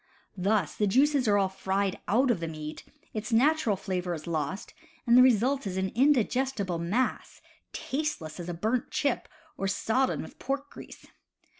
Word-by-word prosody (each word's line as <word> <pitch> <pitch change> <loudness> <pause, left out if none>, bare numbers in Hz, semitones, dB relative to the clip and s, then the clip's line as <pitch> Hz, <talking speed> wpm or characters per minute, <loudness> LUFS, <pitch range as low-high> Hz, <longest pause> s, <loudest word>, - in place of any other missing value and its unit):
Thus 195 -2 +1
the 210 - +1
juices 270 +4 +3
are 205 -1 +4
all 195 -1 +3
fried 190 0 -2
out 250 +5 +3
of 215 - 0
the 165 - -3
meat, 155 -1 -7 0.3
its 215 +2 -4
natural 255 -1 +3
flavor 180 -2 -3
is 155 - -9
lost, 160 +3 -3 0.3
and 235 -1 +5
the 250 - +9
result 255 +1 +3
is 185 -1 -4
an 190 0 0
indigestible 250 - +1
mass, 205 +10 -1 0.3
tasteless 265 - -4
as 175 0 -6
a - - -2
burnt 220 +8 -1
chip 280 -4 -1 0.3
or 195 - -1
sodden 225 +6 0
with - - -13
pork 280 +2 -3
grease. - - -12
210 Hz, 165 wpm, -28 LUFS, 185-260 Hz, 0.3 s, the